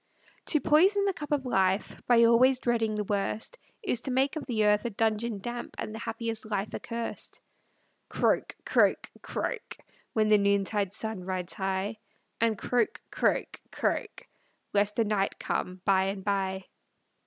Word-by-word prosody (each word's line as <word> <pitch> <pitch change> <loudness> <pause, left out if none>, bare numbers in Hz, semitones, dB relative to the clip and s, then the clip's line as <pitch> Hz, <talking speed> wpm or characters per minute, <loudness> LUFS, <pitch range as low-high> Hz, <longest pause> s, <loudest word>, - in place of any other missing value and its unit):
To 305 - +4
poison 380 +8 +4
the 395 - +1
cup 300 -3 -8
of 285 -3 +1
life, 190 -4 +1
By 235 -1 +6
always 245 +3 +5
dreading 230 -3 0
the 210 - -1
worst. 210 - -2 0.2
Is 245 - 0
to 265 - -3
make 265 +3 +2
of 310 - -5
the 220 -4 +1
earth 210 0 +4
a - - +1
dungeon 220 +1 0
damp, 240 +2 -5
And 215 - -5
the 220 - -6
happiest 225 -1 -4
life 205 -1 -2
accursed. 230 0 -5 0.7
Croak, - - +1
croak, - - +2
croak, - - -4 0.4
When 215 -1 +2
the 210 -1 +5
noontide 200 0 +1
sun 220 -1 -4
rides 185 -1 -3
high, 195 +3 -2 0.4
And 225 -2 +2
croak, 245 - 0
croak, - - 0
croak, - - -2 0.5
Lest 205 0 +2
the 230 - +2
night 205 -2 0
come 185 0 -3
by 190 -1 +4
and 195 0 -3
by. 190 -1 -1
215 Hz, 155 wpm, -29 LUFS, 200-240 Hz, 0.7 s, By